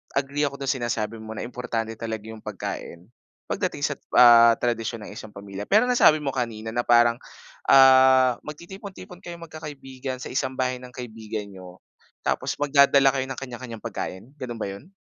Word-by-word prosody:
agree 145 +2 0
ako 140 - -6
dun 135 - +1
sinasabi 115 -3 -3
mo 110 0 -8
na - - -5
importante 115 -2 -4
talaga 110 -2 -4
yung 110 - -10
pagkain 95 -1 -7 0.4
pagdating - - -2
sa, - - -1 0.2
ah, 115 -1 +7
tradisyon 115 -2 -2
ng - - -9
isang 110 -1 -9
pamilya. 100 0 -8
Pero 215 - +3
nasabi 195 -11 +5
mo 135 -2 -3
kanina 115 -3 -3
na 120 - +1
parang, 120 -1 +5 0.6
ah, 130 -1 +7
magtitipon-tipon 185 +3 -10
kayong 170 -1 -8
magkakaibigan 135 -4 -7
sa - - -7
isang 130 - -2
bahay 125 0 -1
ng 125 - -10
kaibigan 110 -4 -7
niyo 95 -2 -12 0.5
tapos - - -1
magdadala 140 -1 +5
kayo 130 - 0
ng 130 -1 -6
kanya-kanyang 125 -3 -8
pagkain, 110 +10 -7
ganun 120 -5 -7
ba 100 - -2
yun? 100 - -9
125 Hz, 165 wpm, -24 LUFS, 110-135 Hz, 0.6 s, ah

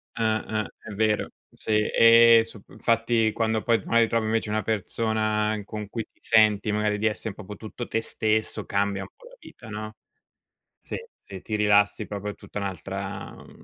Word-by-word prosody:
Ah, 110 -1 0
ah 110 -1 -2
è 110 - -11
vero. 105 +1 +1 0.3
Sì, 105 -1 0
ehm, 115 0 +7
sup 115 -3 -13
infatti 115 -1 +1
quando 110 0 0
poi 115 -1 +2
magari 115 0 +3
trovi 115 -1 0
invece 110 0 0
una 110 0 0
persona 110 0 0
in 105 -2 -7
con 105 -1 -6
cui 115 +1 -3
ti - - -36
senti 110 -2 +3
magari 105 0 0
di 110 - +2
essere 110 0 -3
proprio 105 0 -9
tutto 115 +3 -7
te 115 - 0
stesso, 110 -1 -1
cambia 100 0 0
un - - -7
po' - - -18
la - - -15
vita, 115 - -13
no? 110 0 -6 0.9
Sì, - - -6 0.3
ti 95 -2 -9
ti 110 - -3
rilassi 105 0 +3
proprio 105 0 -5
tutta 105 - -8
è - - -5
un'altra, 95 +1 -5
uhm, - - -16
110 Hz, 185 wpm, -25 LUFS, 105-115 Hz, 0.9 s, ehm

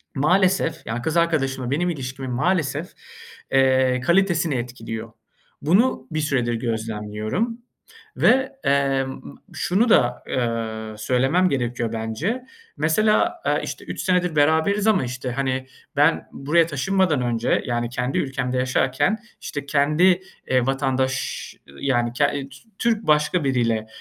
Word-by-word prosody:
maalesef, 165 - +2
ya, 115 +2 -3
kız 160 +6 -1
arkadaşımla 135 -7 0
benim 175 +5 +1
ilişkimin 130 -4 -5
maalesef, 155 +3 0 0.6
eee, 130 -1 +3
kalitesini 170 -3 +2
etkiliyor. 115 -2 -5 0.5
Bunu 180 - +2
bir 155 - -1
süredir 125 -5 0
gözlemliyorum 110 - -3 0.6
ve, 260 +3 +4
emm, 135 -1 +1 0.3
şunu 215 +7 +1
da, 125 - +3
aaa, 110 -2 -3
söylemem 130 +11 +2
gerekiyor 120 -4 -2
bence. 140 - -3 0.3
Mesela, 215 - +2
aaa, - - +2
işte - - -6
3 - - -5
senedir 180 -3 +1
beraberiz 160 +8 +3
ama 210 -7 +3
işte, 125 +1 -4
hani, 130 0 -2 0.3
ben 150 +3 +3
buraya 160 +4 +2
taşınmadan 170 -1 +1
önce, 120 -1 0
yani 120 -1 -1
kendi 125 +2 -2
ülkemde 130 -2 -1
yaşarken 130 +9 +1 0.2
işte 145 -1 -5
kendi, 155 +6 +3 0.3
eee, 130 -2 +2
vatandaş-ş, 135 -1 -1
ııı, 70 - -15
yani, 120 -3 +1
ke 125 - +1
T 140 -2 -4 0.3
Türk 225 -2 0
başka 150 +3 +3
biriyle 115 -5 0
135 Hz, 125 wpm, -23 LUFS, 125-170 Hz, 0.6 s, ve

